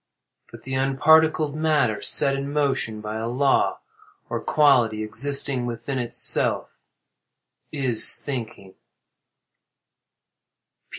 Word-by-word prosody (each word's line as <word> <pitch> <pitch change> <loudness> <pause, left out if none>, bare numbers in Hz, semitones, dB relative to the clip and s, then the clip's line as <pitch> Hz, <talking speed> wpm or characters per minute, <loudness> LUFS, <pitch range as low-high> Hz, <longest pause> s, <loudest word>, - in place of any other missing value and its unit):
But - - -14
the 130 - -7
unparticled 150 +3 +2
matter, 150 -9 0
set 135 +7 +2
in 140 +1 -5
motion 135 -7 -1
by 105 +1 -6
a 110 +1 -4
law, 135 +3 0 0.5
or - - -3
quality, 125 -8 +2
existing 135 +2 0
within 120 +3 -5
itself, 120 -1 0 1.0
is 130 -7 +3
thinking. 115 -8 -7
130 Hz, 95 wpm, -23 LUFS, 115-145 Hz, 1.0 s, is